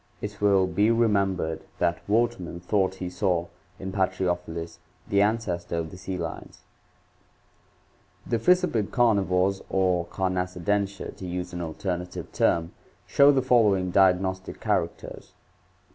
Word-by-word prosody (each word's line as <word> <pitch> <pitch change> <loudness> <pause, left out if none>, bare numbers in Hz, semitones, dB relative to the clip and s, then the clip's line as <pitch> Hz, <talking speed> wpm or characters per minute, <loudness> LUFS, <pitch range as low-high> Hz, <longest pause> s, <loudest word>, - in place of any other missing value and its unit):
It 105 0 -7
will 100 -2 +4
be 95 +4 +2
remembered 100 -8 +1 0.2
that 85 -1 0
Wortman 110 -5 0
thought 95 +1 0
he 95 -1 -5
saw 90 -1 0 0.3
in 95 0 -6
Patriofelis 90 -3 -2 0.3
the 100 0 +3
ancestor 105 -6 -1
of 80 -1 -3
the - - -10
sea 95 0 -4
lions 85 -2 -7 1.7
(page 115 -2 0
552). 180 -8 +3
The 100 - -5
fissiped - - -18
carnivores 100 -5 +2
or 90 -3 +1
Carnassidentia, 95 +2 -2
to 95 - -8
use 90 0 -4
an 85 - -4
alternative 90 +2 -4
term, 85 0 +1 0.3
show 140 +1 +6
the 135 -2 +1
following 105 -8 +3
diagnostic 95 0 +2
characters: - - -3
1. - - -37
95 Hz, 130 wpm, -26 LUFS, 90-105 Hz, 1.7 s, show